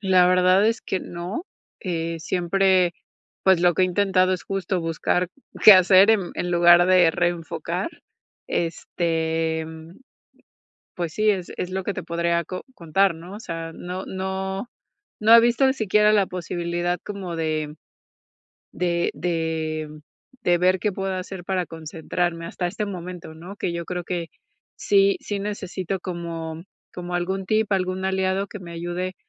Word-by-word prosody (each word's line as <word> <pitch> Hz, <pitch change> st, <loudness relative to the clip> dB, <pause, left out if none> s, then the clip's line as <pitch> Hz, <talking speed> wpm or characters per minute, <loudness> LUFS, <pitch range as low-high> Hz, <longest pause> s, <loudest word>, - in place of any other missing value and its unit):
La 185 Hz, -2 st, +4 dB
verdad 185 Hz, +2 st, +4 dB
es 230 Hz, +1 st, +1 dB
que 190 Hz, -, -3 dB
no, 175 Hz, -, -5 dB, 0.4 s
eh, 165 Hz, -2 st, -3 dB
siempre, 180 Hz, +1 st, +2 dB, 0.5 s
pues, 190 Hz, -3 st, +5 dB
lo 175 Hz, -1 st, +4 dB
que -, -, +2 dB
he -, -, +6 dB
intentado 185 Hz, 0 st, +2 dB
es, 185 Hz, -, -2 dB
justo, 190 Hz, -2 st, -2 dB
buscar 165 Hz, +2 st, 0 dB, 0.4 s
qué 215 Hz, -, +12 dB
hacer 190 Hz, +2 st, +7 dB
en 200 Hz, -5 st, +2 dB
en 180 Hz, -, -2 dB
lugar 175 Hz, 0 st, +6 dB
de 180 Hz, -3 st, +5 dB
reenfocar, 175 Hz, -1 st, -2 dB, 0.6 s
este, 165 Hz, -1 st, -1 dB, 1.3 s
pues 170 Hz, -3 st, -3 dB
sí, 215 Hz, 0 st, +2 dB
es 190 Hz, -4 st, -1 dB
es 180 Hz, -, -3 dB
lo 190 Hz, 0 st, -2 dB
que 200 Hz, -, -2 dB
te -, -, -5 dB
podría 170 Hz, 0 st, 0 dB
co 185 Hz, +3 st, -6 dB
contar, 175 Hz, +1 st, +2 dB
¿no?, 170 Hz, +4 st, -10 dB
o -, -, -8 dB
sea, 165 Hz, -5 st, -6 dB
no 180 Hz, +1 st, -6 dB
no 190 Hz, +3 st, -4 dB, 0.5 s
no 220 Hz, +1 st, +6 dB
he -, -, +10 dB
visto 240 Hz, +3 st, +3 dB
ni 265 Hz, -, +3 dB
siquiera 210 Hz, -2 st, +3 dB
la 205 Hz, -2 st, +4 dB
posibilidad 175 Hz, 0 st, -2 dB
como 195 Hz, -4 st, -5 dB
de 155 Hz, -2 st, -2 dB, 1.0 s
de 175 Hz, -1 st, 0 dB
de 160 Hz, -2 st, -2 dB, 0.5 s
de 175 Hz, 0 st, +3 dB
ver 185 Hz, +1 st, +3 dB
qué 210 Hz, -, 0 dB
puedo 195 Hz, 0 st, -3 dB
hacer 185 Hz, -1 st, -6 dB
para 185 Hz, -2 st, -1 dB
concentrarme 165 Hz, +1 st, -3 dB
hasta 175 Hz, +1 st, -3 dB
este 210 Hz, +4 st, -3 dB
momento, 180 Hz, -4 st, -7 dB
¿no?, 175 Hz, +5 st, -10 dB
que 175 Hz, -, -2 dB
yo 170 Hz, -, -3 dB
creo 180 Hz, 0 st, -4 dB
que, 170 Hz, -1 st, -3 dB, 0.5 s
sí 395 Hz, -2 st, +3 dB
sí 205 Hz, -1 st, -3 dB
necesito, 195 Hz, -2 st, -4 dB
como 165 Hz, -2 st, -5 dB, 0.3 s
como 180 Hz, 0 st, -5 dB
algún 190 Hz, +2 st, -2 dB
tip, 215 Hz, +1 st, +1 dB
algún 185 Hz, 0 st, -1 dB
aliado 190 Hz, +1 st, 0 dB
que 210 Hz, -, -9 dB
me 175 Hz, -2 st, -10 dB
ayude 175 Hz, +2 st, -4 dB
180 Hz, 155 wpm, -23 LUFS, 170-190 Hz, 1.3 s, qué